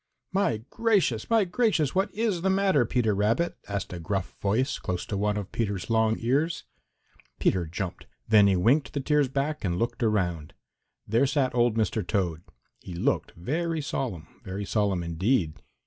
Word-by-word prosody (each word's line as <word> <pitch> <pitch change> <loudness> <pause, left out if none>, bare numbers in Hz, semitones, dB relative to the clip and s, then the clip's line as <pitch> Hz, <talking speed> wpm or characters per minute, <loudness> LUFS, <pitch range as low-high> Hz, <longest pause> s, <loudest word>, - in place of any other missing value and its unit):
"My 185 - 0
gracious! 200 - +1
My 225 -3 +4
gracious! 175 - +1
What 190 +2 +1
is 210 -5 -1
the 190 - +1
matter, 190 -9 +3
Peter 115 -3 +1
Rabbit?" 115 +12 +1
asked 100 -2 -4
a 90 - -5
gruff 95 +2 -3
voice 115 +8 0
close 90 -1 -3
to 105 - -4
one 105 +1 0
of 100 -2 -5
Peter's 100 -2 -2
long 110 0 +3
ears. 145 +8 0 0.8
Peter 90 -3 +1
jumped. 90 +3 -5 0.2
Then 105 -2 +6
he 95 - +3
winked 120 - +2
the 145 - -1
tears 145 0 +2
back 140 +3 -2
and 90 -3 0
looked 115 +6 -2
around. 90 -9 0 0.5
There 115 +6 +3
sat 135 -2 +1
old 120 -2 +2
Mr. 110 0 +1
Toad. 90 -6 -1 0.4
He 90 - -9
looked 85 - 0
very 160 - -2
solemn, 125 - -3 0.2
very 95 +2 -5
solemn 100 -2 0
indeed. 85 +1 0
110 Hz, 165 wpm, -27 LUFS, 95-150 Hz, 0.8 s, Then